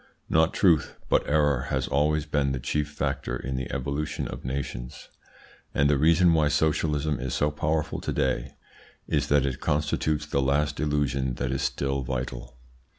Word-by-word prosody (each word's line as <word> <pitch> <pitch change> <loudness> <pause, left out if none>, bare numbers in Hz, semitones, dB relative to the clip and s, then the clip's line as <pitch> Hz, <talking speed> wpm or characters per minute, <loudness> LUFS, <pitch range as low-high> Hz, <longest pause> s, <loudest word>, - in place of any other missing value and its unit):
Not 80 0 +4
truth, 85 -6 +3
but - - +2
error 75 -4 +2
has 65 -1 0
always 75 +3 +1
been 70 -3 0
the 65 - -2
chief 75 +4 -1
factor 70 -1 -2
in 65 +1 -4
the 65 -1 -4
evolution 70 +3 -2
of - - -7
nations, 65 -1 -5 0.7
and 70 - +4
the 75 - +3
reason 85 +3 +5
why 80 -2 +3
socialism 75 -1 +1
is 65 0 -3
so 75 +1 +1
powerful 75 0 -1
to - - -3
day 65 0 -1 0.5
is - - 0
that 70 -1 +3
it 65 -2 -2
constitutes 75 +1 0
the 70 -2 0
last 75 +2 +1
illusion 70 -4 0
that 60 +1 -2
is 65 +1 -1
still 70 0 -1
vital. 60 -1 -5
70 Hz, 165 wpm, -26 LUFS, 65-75 Hz, 0.7 s, reason